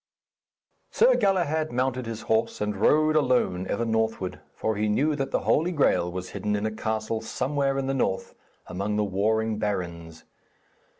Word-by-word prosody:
Sir - - +4
Galahad 170 -6 +1
mounted 125 0 -1
his 115 -1 -5
horse 110 +1 0
and 105 0 -1
rode 155 +9 +3
alone, 125 -11 +2
ever 115 +3 -1
northward, 110 -4 -1 0.2
for 110 - -1
he 105 +1 0
knew 145 +8 +2
that 135 -1 -2
the - - 0
Holy 165 +4 +2
Graal 135 - +2
was 90 +1 -5
hidden 105 +1 -2
in 105 +1 -2
a 110 - -1
castle 110 +1 -2
somewhere 135 +4 -1
in 135 - -1
the 135 - -1
north 95 -8 -1 0.3
among 100 +3 -3
the 105 - +1
warring 105 +2 0
barons. 85 -5 -4
110 Hz, 165 wpm, -26 LUFS, 105-135 Hz, 0.3 s, Sir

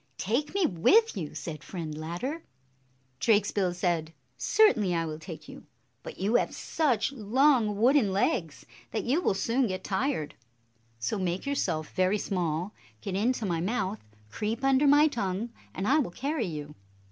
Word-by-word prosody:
"Take 245 - -1
me 395 -3 +3
with 370 - +4
you!" 165 -7 -5
said 155 -3 -6
Friend 165 -5 -6
Ladder. 175 - -4 0.8
Drakesbill 205 -4 +2
said, 170 -3 -1 0.2
"Certainly 220 - +3
I 165 0 0
will 155 -1 -5
take 155 - -9
you; - - -12 0.3
but - - -9
you 200 +5 0
have - - -1
such 265 -8 0
long 240 -2 +2
wooden 245 -3 +4
legs 175 -5 -1 0.2
that - - -2
you 275 +8 +1
will 195 - +1
soon 235 +5 +1
get 185 -1 -4
tired. 195 - -1 0.6
So 115 - -2
make 180 0 -2
yourself 175 - -1
very 185 +3 +2
small, 180 -1 -2 0.3
get 195 - -4
into 225 +4 0
my 170 -4 -1
mouth, 200 +1 -1 0.3
creep 220 - -3
under 270 +1 +4
my 290 +2 +6
tongue, 225 -4 -2 0.2
and 195 - -3
I 295 +4 +4
will 270 - 0
carry 270 - -2
you." 150 -3 -6
205 Hz, 160 wpm, -28 LUFS, 175-260 Hz, 0.8 s, my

